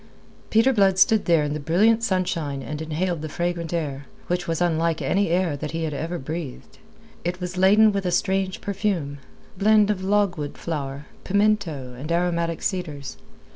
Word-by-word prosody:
Peter 230 +5 +4
Blood 195 -4 +3
stood 220 +1 +4
there 165 -3 +4
in 145 0 -2
the 150 - -3
brilliant 205 +10 +3
sunshine 180 -9 -1
and 150 +2 -5
inhaled 160 +1 -2
the 155 - -5
fragrant 170 +1 -2
air, 145 -5 -3 0.2
which 175 0 -2
was 165 -1 -1
unlike 165 -2 +1
any 200 -1 +1
air 175 -3 +1
that 150 +2 -5
he 165 0 -2
had 155 -2 -2
ever 165 +5 -3
breathed. 155 -2 -7 0.4
It 180 +1 -2
was 180 0 -5
laden 205 +4 +5
with 195 -2 -2
a - - 0
strange 190 +1 0
perfume, 190 -8 -2 0.4
blend 210 0 +5
of 190 -2 -3
logwood 190 -7 0
flower, 140 -3 -4 0.2
pimento, 200 -10 0
and 140 +6 -6
aromatic 170 -1 0
cedars. 155 -8 -3
175 Hz, 170 wpm, -24 LUFS, 155-195 Hz, 0.4 s, laden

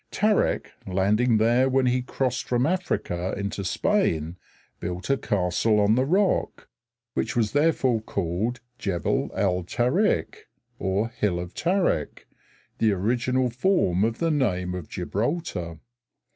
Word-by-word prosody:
Tarik, 210 +1 +1 0.2
landing 105 +5 +2
there 120 +4 +3
when 130 0 +2
he 125 0 +2
crossed 125 -1 -2
from 125 +1 +1
Africa 155 - -1
into 100 0 -3
Spain, 90 - 0 0.4
built 90 +8 -3
a - - +4
castle 105 +1 +1
on 105 +1 +4
the 130 +3 +2
rock, 190 +5 +1 0.5
which 120 +3 -2
was 110 -3 +1
therefore 145 -6 +2
called 100 +5 -2 0.2
Gebel 95 -5 -1
al 90 -2 +1
Tarik 125 - 0 0.3
(Hill 100 -1 -1
of 90 0 -6
Tarik), 175 - 0 0.5
the 110 -1 +3
original 120 +5 0
form 120 - +2
of 115 +1 0
the 165 -1 0
name 90 - -1
Gibraltar. 100 - -3
115 Hz, 120 wpm, -25 LUFS, 95-130 Hz, 0.5 s, a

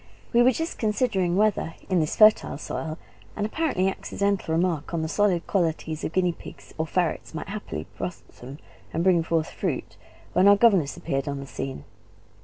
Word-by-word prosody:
We 235 - +6
were 250 +2 +6
just 325 +6 -4
considering 210 -5 +1
whether 205 -6 +1
in 185 -2 +2
this 155 -2 0
fertile 215 -8 +5
soil 155 +1 -5 0.4
an 205 - -1
apparently 220 - 0
accidental 195 -3 -1
remark 170 -2 0
on 160 - -1
the - - -1
solid 185 -1 +1
qualities 160 -4 -1
of - - -2
guinea 180 0 +2
pigs - - -13
or 160 - 0
ferrets 170 -1 -1
might 160 - -5
haply 200 - -5
blossom 130 +3 -7 0.4
and 165 - 0
bring 180 -2 +4
forth 165 -1 -1
fruit, - - -3 0.4
when 190 - +5
our 200 - +8
governess 195 -10 +3
appeared 135 0 -2
on 140 -1 -3
the 140 - -6
scene. 135 - -6
175 Hz, 175 wpm, -25 LUFS, 160-205 Hz, 0.4 s, our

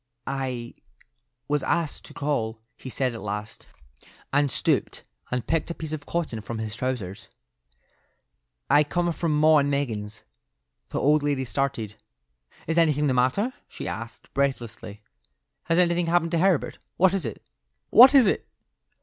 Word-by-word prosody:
"I—was 125 +1 -6
asked 165 +2 -1
to - - -12
call," 115 -7 -1 0.2
he 130 - -9
said 130 -1 -1
at 115 - -7
last, 105 +2 -6 0.7
and 145 0 +3
stooped - - 0 0.3
and 125 -2 -2
picked 165 +4 0
a 170 - -4
piece 155 -1 -6
of 145 -2 -6
cotton 155 -10 -2
from 115 +2 -6
his 110 0 -4
trousers. 115 -4 -4 1.4
"I 145 +2 +5
come 175 +3 0
from 165 0 -1
'Maw 155 0 +6
and 140 0 +1
Meggins.'" 110 -7 -3 0.7
The - - -2
old 150 +2 +3
lady 140 -2 0
started. 120 -5 -2 0.7
"Is 165 +2 +1
anything 150 -3 +3
the 135 - +2
matter?" 130 - +1
she - - -7
asked, 115 +1 -7
breathlessly. 115 -6 -3 0.6
"Has 165 +1 +1
anything 175 -1 +2
happened 165 0 +2
to 170 - +1
Herbert? 185 -3 +1 0.2
What 185 +1 +4
is 195 -4 -1
it? 115 -5 -6 0.5
What 260 +4 +9
is 265 -4 +8
it?" 195 - 0
140 Hz, 150 wpm, -25 LUFS, 115-165 Hz, 1.4 s, What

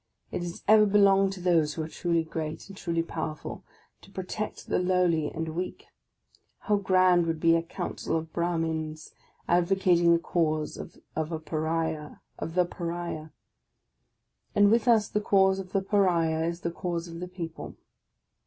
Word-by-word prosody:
It - - -3
has 175 0 -6
ever 215 0 +7
belonged 195 -1 +4
to 190 - -9
those 165 -4 +2
who 160 - -2
are - - -5
truly 170 0 0
great 160 -1 -5
and 195 - -10
truly 170 -2 -1
powerful, 160 -2 -5 0.4
to - - -16
protect 195 +2 -5
the - - 0
lowly 180 -4 +2
and 160 0 -4
weak. 175 +3 -5 0.8
How 210 -2 +2
grand 185 -3 +4
would 165 -1 -1
be 165 +1 +4
a 165 - +2
Council 165 -1 -3
of 160 0 -6
Brarnins 160 -2 -2 0.3
advocating 175 -1 +3
the 170 - +6
cause 155 -2 -1
of - - -9 0.2
the 160 +1 -2
Paria! 160 -1 -2 2.4
And 205 0 +5
with 230 +1 +3
us 220 -3 +5
the 210 - -1
cause 190 -2 +3
of 185 -1 -7
the 195 -1 0
Paria 170 -5 +2
is 170 +1 -3
the 170 - -2
cause 175 0 -3
of 165 0 -8
the 180 - -5
people. 170 -3 -7
170 Hz, 155 wpm, -28 LUFS, 160-190 Hz, 2.4 s, ever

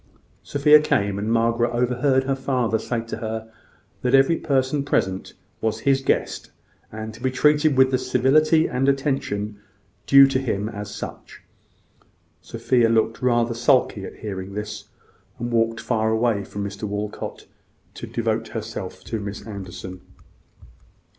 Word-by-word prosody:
Sophia 150 +1 +5
came, 100 -9 0
and 105 +2 -2
Margaret 115 +1 +2
overheard 125 +2 +2
her 135 0 0
father 125 -4 0
say 120 0 -2
to 115 - -6
her, 110 0 -5 0.5
that 125 +1 +3
every 135 +5 +5
person 140 -2 0
present 95 -8 -1 0.3
was 110 -1 -1
his 135 -1 +2
guest, - - -1 0.4
and 110 0 -6
to 115 - -14
be 130 - +1
treated 150 +2 +3
with 130 0 +5
the 130 - +1
civility 135 +6 +3
and 135 -1 +1
attention 130 -7 -1 0.5
due 140 0 +9
to 135 -1 +1
him 110 -6 -2
as 105 -2 -7
such. - - -9 1.0
Sophia 120 -3 +1
looked 115 0 +1
rather 120 -2 +2
sulky 115 -3 +2
at - - -8
hearing 100 -2 -6
this, 105 0 -5 0.5
and 120 0 -4
walked 115 0 +1
far 110 -2 0
away 110 -2 +1
from 100 +1 -6
Mr 100 +1 -5
Walcot 105 0 -5 0.5
to - - -8
devote - - -1
herself - - -6
to 110 - -4
Miss 100 +1 -6
Anderson. 95 -3 -8
115 Hz, 145 wpm, -23 LUFS, 105-130 Hz, 1.0 s, due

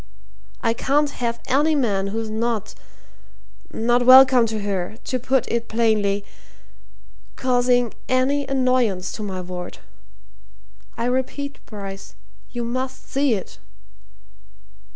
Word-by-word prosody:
I 230 -1 +2
can't 285 +5 +1
have 235 -3 -3
any 295 +4 +2
man 205 -8 0
who's 220 +2 -4
not 225 -1 -2 1.0
not 240 +2 +1
welcome 255 -1 +8
to 220 -1 -3
her, 200 0 -3
to 255 - -2
put 260 +1 +1
it 235 0 -2
plainly 210 -3 +1 1.1
causing 245 -2 +2 0.2
any 270 +2 +1
annoyance 255 -8 +1
to - - -7
my 190 -3 -4
ward. 180 0 -7 1.2
I 230 - -1
repeat, 260 +3 -2
Bryce 195 - -8 0.3
you 240 - -4
must 255 +2 -4
see 275 -4 +2
it!" 190 - -8
235 Hz, 110 wpm, -22 LUFS, 210-255 Hz, 1.2 s, welcome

